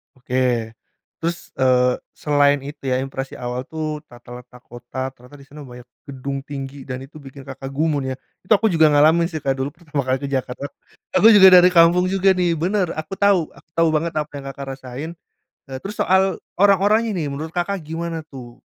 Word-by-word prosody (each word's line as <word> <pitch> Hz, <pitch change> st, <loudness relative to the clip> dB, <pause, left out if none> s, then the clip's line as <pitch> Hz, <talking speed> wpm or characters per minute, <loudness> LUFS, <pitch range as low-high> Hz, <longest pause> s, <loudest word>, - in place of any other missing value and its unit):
Oke, 125 Hz, -3 st, -1 dB, 0.5 s
terus, 170 Hz, +1 st, -4 dB
eee, 125 Hz, -1 st, +3 dB, 0.2 s
selain 145 Hz, -1 st, +2 dB
itu 145 Hz, -, -10 dB
ya, 130 Hz, -1 st, 0 dB
impresi 135 Hz, 0 st, -5 dB
awal 125 Hz, +1 st, -4 dB
tuh 155 Hz, 0 st, -5 dB
tata 120 Hz, 0 st, -11 dB
letak 125 Hz, 0 st, -17 dB
kota. 120 Hz, +2 st, -6 dB
Ternyata 125 Hz, +4 st, -16 dB
di 140 Hz, -, -15 dB
sana 145 Hz, +1 st, -11 dB
banyak 125 Hz, -1 st, -12 dB, 0.2 s
gedung 140 Hz, -1 st, -6 dB
tinggi, 140 Hz, -1 st, -7 dB
dan 130 Hz, -1 st, -6 dB
itu 145 Hz, +4 st, -16 dB
bikin 135 Hz, 0 st, -12 dB
Kakak 135 Hz, 0 st, -7 dB
gumun, 145 Hz, -2 st, -1 dB
ya. 130 Hz, -, -3 dB, 0.3 s
Itu 185 Hz, -, -19 dB
aku 220 Hz, +1 st, +5 dB
juga 160 Hz, -5 st, +4 dB
ngalamin 160 Hz, +4 st, +4 dB
sih, 155 Hz, -, -4 dB
Kak. 135 Hz, -2 st, -1 dB
Dulu 135 Hz, +1 st, -3 dB
pertama 150 Hz, -5 st, -4 dB
kali 130 Hz, +1 st, 0 dB
ke 140 Hz, -, -5 dB
Jakarta. 135 Hz, 0 st, -3 dB, 0.5 s
Aku 225 Hz, +2 st, +7 dB
juga 200 Hz, -3 st, +9 dB
dari 180 Hz, +1 st, +5 dB
kampung 175 Hz, +1 st, +5 dB
juga 195 Hz, 0 st, +3 dB
nih, 175 Hz, -3 st, +1 dB
bener. 185 Hz, 0 st, 0 dB
Aku 160 Hz, +5 st, -6 dB
tahu 200 Hz, -2 st, +4 dB, 0.2 s
aku -, -, -20 dB
tahu 165 Hz, 0 st, +2 dB
banget 165 Hz, +2 st, 0 dB
apa 150 Hz, -1 st, -4 dB
yang 140 Hz, -1 st, -7 dB
Kakak 140 Hz, 0 st, -8 dB
rasain. 130 Hz, +4 st, -7 dB, 0.6 s
Eee, 130 Hz, -, -6 dB
terus 210 Hz, +2 st, -6 dB
soal 190 Hz, 0 st, +2 dB, 0.2 s
orang-orangnya 205 Hz, +3 st, +3 dB
nih, 165 Hz, -6 st, -2 dB
menurut 150 Hz, +3 st, -6 dB
Kakak 180 Hz, +3 st, -2 dB
gimana 165 Hz, 0 st, -5 dB
tuh? 125 Hz, -5 st, -12 dB
145 Hz, 190 wpm, -21 LUFS, 130-170 Hz, 0.6 s, juga